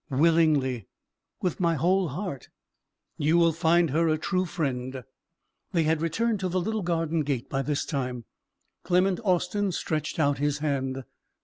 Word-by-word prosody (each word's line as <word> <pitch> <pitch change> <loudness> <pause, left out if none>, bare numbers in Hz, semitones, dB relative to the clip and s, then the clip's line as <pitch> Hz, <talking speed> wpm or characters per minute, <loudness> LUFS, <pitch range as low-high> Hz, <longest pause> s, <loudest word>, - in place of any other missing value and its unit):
"Willingly, 145 - +2 0.6
with 180 -4 -1
my 170 -2 +2
whole 180 +5 +2
heart." 165 - -5 0.7
"You 155 +3 +3
will 170 -1 +5
find 165 -1 +3
her 165 +3 +2
a 155 -1 +2
true 185 +4 0
friend." 130 -7 -3 0.7
They 170 -2 +3
had 160 0 +1
returned 210 +7 0
to 185 -1 -1
the 185 +1 0
little 220 +4 -1
garden 165 -2 0
gate 140 -5 -2
by 135 - 0
this 145 +1 -1
time. 125 -5 -3 0.6
Clement 185 +1 +2
Austin 190 +1 +1
stretched 155 -2 -2
out 145 -3 +2
his 145 0 +1
hand. 135 -3 -2
160 Hz, 150 wpm, -27 LUFS, 140-180 Hz, 0.7 s, will